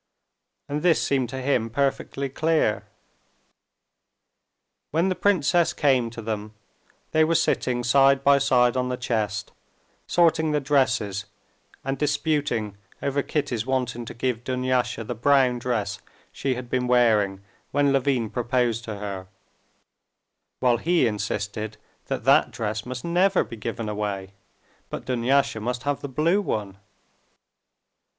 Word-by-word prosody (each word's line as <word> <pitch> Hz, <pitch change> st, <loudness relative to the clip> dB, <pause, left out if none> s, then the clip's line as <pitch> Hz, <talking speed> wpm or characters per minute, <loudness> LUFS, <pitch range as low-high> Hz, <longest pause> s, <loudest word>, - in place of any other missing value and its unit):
And 145 Hz, +1 st, -3 dB
this 170 Hz, -1 st, +4 dB
seemed 130 Hz, -4 st, 0 dB
to 130 Hz, +1 st, -5 dB
him 125 Hz, -4 st, +1 dB
perfectly 140 Hz, +2 st, -1 dB
clear. 155 Hz, -5 st, 0 dB, 2.0 s
When 165 Hz, +5 st, +1 dB
the 185 Hz, -, 0 dB
princess 175 Hz, -4 st, +2 dB
came 130 Hz, -5 st, +2 dB
to 115 Hz, 0 st, -9 dB
them, 105 Hz, -1 st, -4 dB, 0.6 s
they 160 Hz, -, +4 dB
were 165 Hz, +1 st, +2 dB
sitting 120 Hz, -5 st, +1 dB
side 135 Hz, +2 st, +4 dB
by 140 Hz, 0 st, +5 dB
side 125 Hz, -3 st, +3 dB
on 125 Hz, 0 st, 0 dB
the 125 Hz, -, -2 dB
chest, 105 Hz, -4 st, -2 dB, 0.6 s
sorting 160 Hz, -2 st, +3 dB
the 150 Hz, -, +2 dB
dresses 130 Hz, -8 st, +1 dB, 0.6 s
and 135 Hz, 0 st, -2 dB
disputing 145 Hz, -8 st, 0 dB, 0.3 s
over 140 Hz, 0 st, 0 dB
Kitty's 135 Hz, -5 st, -2 dB
wanting 125 Hz, -2 st, -1 dB
to -, -, -8 dB
give 120 Hz, -1 st, -2 dB
Dunyasha 125 Hz, -2 st, -1 dB
the 115 Hz, -, -4 dB
brown 130 Hz, 0 st, +3 dB
dress 110 Hz, -5 st, -2 dB, 0.3 s
she 135 Hz, -2 st, -2 dB
had 125 Hz, 0 st, -6 dB
been 125 Hz, 0 st, -1 dB
wearing 110 Hz, -6 st, +3 dB, 0.3 s
when 140 Hz, 0 st, +2 dB
Levin 130 Hz, -5 st, +1 dB
proposed 120 Hz, -1 st, 0 dB
to 110 Hz, -, -5 dB
her, 100 Hz, -2 st, -6 dB, 1.3 s
while 125 Hz, -2 st, +3 dB
he 170 Hz, +7 st, +2 dB
insisted 105 Hz, 0 st, -3 dB, 0.3 s
that -, -, -3 dB
that -, -, +5 dB
dress 105 Hz, +1 st, -4 dB
must 130 Hz, +2 st, -5 dB
never 180 Hz, +3 st, +3 dB
be -, -, -9 dB
given 115 Hz, 0 st, -4 dB
away, 100 Hz, -2 st, -3 dB, 0.6 s
but -, -, -6 dB
Dunyasha 130 Hz, 0 st, +1 dB
must 120 Hz, +3 st, -3 dB
have 145 Hz, 0 st, -1 dB
the 140 Hz, -, -5 dB
blue 165 Hz, +9 st, +2 dB
one. 100 Hz, -, -3 dB
125 Hz, 135 wpm, -25 LUFS, 110-140 Hz, 2.0 s, by